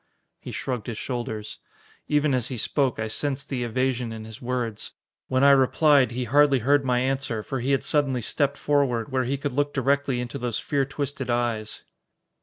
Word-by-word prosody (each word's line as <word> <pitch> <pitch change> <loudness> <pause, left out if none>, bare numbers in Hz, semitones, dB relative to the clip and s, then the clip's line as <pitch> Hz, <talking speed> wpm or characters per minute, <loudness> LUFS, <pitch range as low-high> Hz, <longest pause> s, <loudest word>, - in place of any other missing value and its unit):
He - - -9
shrugged 125 -4 -4
his 115 -3 -4
shoulders. 115 -4 -5 0.5
Even 150 -1 +2
as 125 -2 +1
he 130 - -5
spoke, 135 +3 +1
I 110 - -2
sensed 135 +4 -3
the 125 -3 -2
evasion 125 0 -1
in 110 -1 -7
his 110 +4 -11
words. 120 -3 -3 0.3
When 130 +1 +1
I 140 - +8
replied, 140 0 +4
he 125 +2 -3
hardly 140 +3 +4
heard 145 0 +4
my 125 -2 +1
answer, 130 -4 -1
for 135 - -3
he 125 +3 -2
had 135 -2 +2
suddenly 135 -4 +1
stepped 140 +5 0
forward, 135 -5 +1
where 130 -1 +1
he 135 +3 -1
could 145 +1 -3
look 145 +3 -1
directly 140 -1 +1
into 125 +3 -4
those 120 -3 -1
fear 140 -2 0
twisted 140 -1 -4
eyes. 120 -3 -1
130 Hz, 190 wpm, -25 LUFS, 120-140 Hz, 0.5 s, I